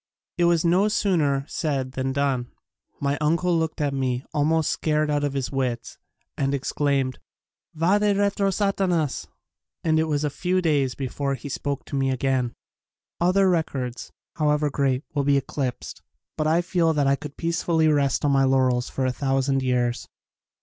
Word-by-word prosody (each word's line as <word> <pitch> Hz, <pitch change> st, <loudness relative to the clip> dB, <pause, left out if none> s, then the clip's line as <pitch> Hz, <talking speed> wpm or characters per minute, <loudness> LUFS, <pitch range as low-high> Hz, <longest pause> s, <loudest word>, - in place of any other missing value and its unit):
It 175 Hz, -, +4 dB
was 170 Hz, -1 st, +3 dB
no 180 Hz, +5 st, +4 dB
sooner 155 Hz, -10 st, +1 dB
said 135 Hz, -5 st, -2 dB
than 130 Hz, 0 st, -2 dB
done. 135 Hz, -3 st, 0 dB, 0.5 s
My 140 Hz, 0 st, -1 dB
uncle 170 Hz, +3 st, +2 dB
looked 160 Hz, -1 st, -1 dB
at 145 Hz, -2 st, 0 dB
me 130 Hz, -1 st, -1 dB
almost 155 Hz, +1 st, +2 dB
scared 150 Hz, -1 st, 0 dB
out 145 Hz, 0 st, 0 dB
of 145 Hz, -1 st, -1 dB
his 135 Hz, -2 st, -2 dB
wits 125 Hz, -4 st, -3 dB, 0.4 s
and 140 Hz, 0 st, 0 dB
ex 135 Hz, -, -3 dB
claimed 140 Hz, -3 st, 0 dB, 0.6 s
"Fade 200 Hz, +4 st, +3 dB
retro 200 Hz, 0 st, +1 dB
Satanas!" 190 Hz, -7 st, 0 dB, 0.6 s
and 160 Hz, -1 st, +2 dB
it 160 Hz, -, +2 dB
was 150 Hz, -2 st, -1 dB
a 150 Hz, -, 0 dB
few 180 Hz, +5 st, 0 dB
days 145 Hz, -7 st, +1 dB
before 140 Hz, +1 st, -2 dB
he 135 Hz, +3 st, -8 dB
spoke 140 Hz, +1 st, -3 dB
to -, -, -6 dB
me 135 Hz, -1 st, +1 dB
again. 130 Hz, -2 st, 0 dB, 0.6 s
Other 185 Hz, +3 st, +3 dB
records, 135 Hz, -8 st, -2 dB, 0.3 s
however 150 Hz, -1 st, +1 dB
great, 135 Hz, -1 st, 0 dB
will 145 Hz, -2 st, 0 dB
be 140 Hz, 0 st, +3 dB
eclipsed 135 Hz, -2 st, -4 dB, 0.3 s
but 155 Hz, -, 0 dB
I 165 Hz, +3 st, +3 dB
feel 170 Hz, -2 st, +1 dB
that 145 Hz, -2 st, +1 dB
I 135 Hz, 0 st, +4 dB
could 145 Hz, 0 st, -9 dB
peacefully 165 Hz, -1 st, +1 dB
rest 145 Hz, -3 st, +2 dB
on 145 Hz, -, +3 dB
my 135 Hz, -1 st, +4 dB
laurels 130 Hz, -2 st, +2 dB
for 135 Hz, -, -2 dB
a 130 Hz, -, +1 dB
thousand 135 Hz, +1 st, 0 dB
years. 125 Hz, -2 st, 0 dB
145 Hz, 170 wpm, -24 LUFS, 135-165 Hz, 0.6 s, It